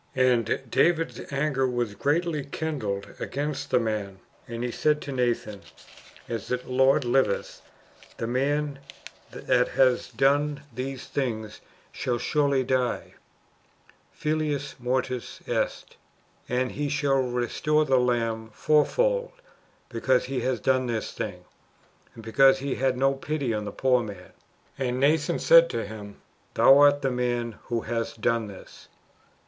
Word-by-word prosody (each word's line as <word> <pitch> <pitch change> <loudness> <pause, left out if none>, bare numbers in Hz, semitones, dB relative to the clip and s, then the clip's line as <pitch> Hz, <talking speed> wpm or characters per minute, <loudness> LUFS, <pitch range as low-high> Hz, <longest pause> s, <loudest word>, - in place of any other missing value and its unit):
And 125 -2 +2
David's 165 +8 +1
anger 135 -2 +1
was 120 -4 -2
greatly 150 - 0
kindled 135 -9 -4
against 145 +1 -3
the 125 - +3
man; 105 -4 -3 0.3
and 115 0 -5
he 125 - -2
said 150 +4 +1
to 140 - -6
Nathan, 120 -5 -1 0.7
As 115 -4 -4
the 125 - -1
Lord 130 +2 +3
liveth, 120 -4 0 0.6
the - - -3
man 140 +4 -1 0.5
that 125 0 +1
hath 130 -2 +1
done 145 +1 +2
this 130 +2 -5
thing 110 -6 -3 0.4
shall 120 -1 -2
surely 140 +1 +1
die 130 -1 -1 1.0
{films 150 -2 -2
mortis 125 0 -2
est): - - -2 0.5
and 125 +1 0
he 145 0 -3
shall 140 -2 +1
restore 130 +5 0
the 135 -2 +3
lamb 115 -2 0
fourfold, - - +2 0.5
because 125 +2 +1
he 130 0 -2
hath 130 -1 -2
done 130 -1 +2
this 115 -2 -2
thing, 90 -4 -6 0.7
and 115 - -11
because 135 +4 +5
he 135 0 -3
had 130 -1 0
no 135 +1 +3
pity 135 -2 -2
for 105 - -1
the 105 -1 -5
poor 125 +2 +2
man. 100 -5 -9 0.5
And 125 -1 -1
Nathan 155 +4 +2
said 165 0 +7
unto 115 -8 -3
him. 105 -1 -9 0.4
Thou 135 +1 +7
art 145 0 +5
the 135 - +1
man 120 -2 -2
who 120 -2 -2
hast 115 0 -3
done 115 0 +1
this." 100 -2 -13
130 Hz, 135 wpm, -26 LUFS, 120-145 Hz, 1.0 s, said